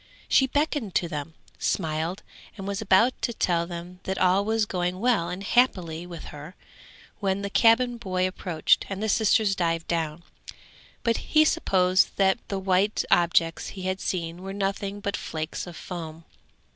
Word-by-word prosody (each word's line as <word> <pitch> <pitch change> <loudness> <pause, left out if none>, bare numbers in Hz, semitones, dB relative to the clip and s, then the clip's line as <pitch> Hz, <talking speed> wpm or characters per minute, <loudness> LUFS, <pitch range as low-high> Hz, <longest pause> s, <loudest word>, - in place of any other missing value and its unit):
She 265 - +4
beckoned 285 - -1
to 175 - +2
them, 150 0 -6 0.2
smiled, 160 +1 -1 0.3
and 195 -1 -6
was 200 0 -2
about 220 +5 +4
to 235 - -1
tell 170 -5 0
them 175 +1 -8
that 190 0 -2
all 185 +2 +3
was 220 +1 +1
going 180 -2 -2
well 225 -7 +2
and 180 +2 -5
happily 180 -8 +1
with 170 -2 -8
her, 150 +5 -10 0.6
when 195 -1 -1
the 200 - -4
cabin 240 +2 +4
boy 185 -4 -1
approached, 180 -4 +1
and 195 +1 -4
the - - 0
sisters 215 -1 +3
dived 165 -2 -1
down, 165 -1 -2 0.8
but 230 -1 +2
he 310 0 +3
supposed 185 - +3
that 195 +3 +3
the 200 - -3
white 190 +2 +1
objects 170 -1 +3
he 190 - -8
had 185 +1 -2
seen 170 -1 -3
were 195 +1 -6
nothing 200 0 -3
but 200 0 -2
flakes 160 +3 -5
of 170 -2 -9
foam. 165 -2 -7
185 Hz, 165 wpm, -26 LUFS, 170-205 Hz, 0.8 s, She